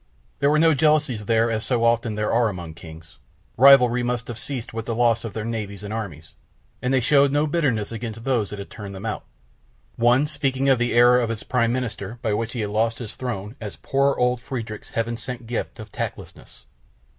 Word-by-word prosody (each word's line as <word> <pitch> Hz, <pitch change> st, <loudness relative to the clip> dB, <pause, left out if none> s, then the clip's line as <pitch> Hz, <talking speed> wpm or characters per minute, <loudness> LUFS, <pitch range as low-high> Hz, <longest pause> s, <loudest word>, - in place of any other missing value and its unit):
There 140 Hz, -, +3 dB
were 150 Hz, -, +3 dB
no 160 Hz, +1 st, +5 dB
jealousies 145 Hz, -7 st, +2 dB
there 115 Hz, +1 st, +2 dB
as 110 Hz, -1 st, -1 dB
so 120 Hz, -3 st, 0 dB
often 115 Hz, -1 st, +2 dB
there 105 Hz, 0 st, -1 dB
are 115 Hz, -1 st, +3 dB
among 85 Hz, -5 st, -7 dB
kings, 80 Hz, -2 st, -13 dB, 0.4 s
rivalry 125 Hz, -2 st, +7 dB
must 120 Hz, -1 st, -2 dB
have 120 Hz, -2 st, -6 dB
ceased 130 Hz, -3 st, -4 dB
with 115 Hz, 0 st, -5 dB
the 115 Hz, -, -1 dB
loss 120 Hz, -1 st, +2 dB
of 115 Hz, -, -6 dB
their 110 Hz, -1 st, -4 dB
navies 105 Hz, -3 st, -4 dB
and 105 Hz, +1 st, -5 dB
armies, 90 Hz, -8 st, -6 dB, 0.5 s
and 125 Hz, -, -1 dB
they 135 Hz, -, +4 dB
showed 140 Hz, +2 st, +4 dB
no 145 Hz, +2 st, +2 dB
bitterness 140 Hz, -10 st, 0 dB
against 115 Hz, 0 st, -6 dB
those 120 Hz, -6 st, 0 dB
that 105 Hz, -, -6 dB
had 100 Hz, -, -8 dB
turned 100 Hz, -2 st, -8 dB
them 95 Hz, +3 st, -8 dB
out, 110 Hz, -, -4 dB, 0.7 s
one 120 Hz, +4 st, +4 dB
speaking 135 Hz, -3 st, 0 dB
of 130 Hz, -3 st, +4 dB
the 120 Hz, 0 st, 0 dB
error 120 Hz, +1 st, +6 dB
of 120 Hz, -2 st, -1 dB
his 115 Hz, -2 st, -4 dB
Prime 115 Hz, -2 st, +1 dB
Minister 120 Hz, -3 st, -4 dB
by 110 Hz, -3 st, +1 dB
which 115 Hz, +2 st, -2 dB
he 120 Hz, -, -3 dB
had 105 Hz, -1 st, -3 dB
lost 115 Hz, +2 st, +1 dB
his 110 Hz, -3 st, -7 dB
throne 110 Hz, -3 st, -5 dB
as 105 Hz, -2 st, -6 dB
"poor 140 Hz, 0 st, +1 dB
old 125 Hz, 0 st, +1 dB
Friedrich's 115 Hz, -4 st, -6 dB
Heaven 115 Hz, 0 st, -2 dB
sent 125 Hz, 0 st, -6 dB
gift 115 Hz, 0 st, -4 dB
of 110 Hz, -2 st, -9 dB
tactlessness." -, -, -7 dB
115 Hz, 215 wpm, -23 LUFS, 110-125 Hz, 0.7 s, rivalry